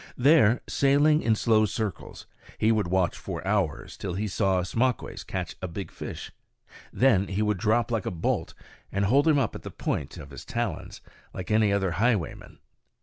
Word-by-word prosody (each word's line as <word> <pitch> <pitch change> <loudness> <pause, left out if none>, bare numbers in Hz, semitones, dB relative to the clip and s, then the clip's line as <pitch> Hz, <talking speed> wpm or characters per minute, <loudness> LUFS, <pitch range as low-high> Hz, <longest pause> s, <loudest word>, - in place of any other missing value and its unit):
There, 125 -4 +5
sailing 145 +3 +3
in 110 -1 +2
slow 110 -1 +3
circles, 105 -4 -5 0.3
he 110 - +3
would 105 -5 +1
watch 90 0 +1
for - - -6
hours 100 -6 -1
till 95 -3 -5
he 105 +3 -2
saw 95 -1 +1
Ismaques 120 +7 -1
catch 90 -2 -4
a 95 - -3
big 95 +3 -6
fish, - - -7 0.6
when 110 -7 +3
he 100 +3 -1
would 105 -3 0
drop 110 +3 +1
like 115 -4 -1
a - - +1
bolt 85 -2 -2 0.4
and 100 0 0
hold 140 +9 +3
him 155 -2 +5
up 130 -6 0
at - - -8
the - - -7
point - - -3
of 70 - -10
his 70 - -9
talons, - - -4 0.3
like 95 +2 -5
any 105 -1 +4
other 95 -2 +1
highwayman. 105 -3 -1
105 Hz, 180 wpm, -27 LUFS, 95-120 Hz, 0.6 s, There